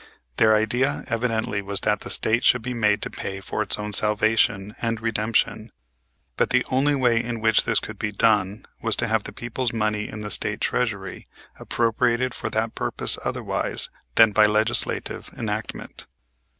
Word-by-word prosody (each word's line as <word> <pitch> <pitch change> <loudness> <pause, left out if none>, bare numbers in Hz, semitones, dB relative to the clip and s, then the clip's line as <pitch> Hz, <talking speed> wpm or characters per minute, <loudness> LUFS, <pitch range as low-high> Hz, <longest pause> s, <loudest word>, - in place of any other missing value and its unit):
Their 110 0 +5
idea 120 +6 +1
evidently 115 -3 -1
was 100 0 -1
that 105 0 +1
the - - -8
State 115 +2 +1
should 125 -3 +4
be 125 +1 -3
made 105 -3 +1
to - - -3
pay 95 0 -5
for 95 - -4
its - - -1
own 105 0 -5
salvation 105 0 +1
and 115 -1 -1
redemption, 110 0 0 0.7
but - - +2
the - - +2
only 140 +3 +3
way 120 -4 +2
in 120 -1 -4
which 110 -1 +3
this - - +2
could 110 -2 -9
be 105 - -2
done 105 -1 +1 0.2
was 115 -2 +2
to 120 - +1
have 110 -2 0
the - - -5
people's 120 0 -3
money 110 -1 -1
in 105 - -7
the 105 -1 -5
State 105 -2 -1
treasury 100 -7 -2 0.3
appropriated 120 +2 +1
for - - -4
that 110 +1 -1
purpose - - -1
otherwise - - -2 0.2
than 115 -1 +7
by 105 +1 +5
legislative 110 +2 -1
enactment. - - -5
110 Hz, 170 wpm, -24 LUFS, 105-115 Hz, 0.7 s, than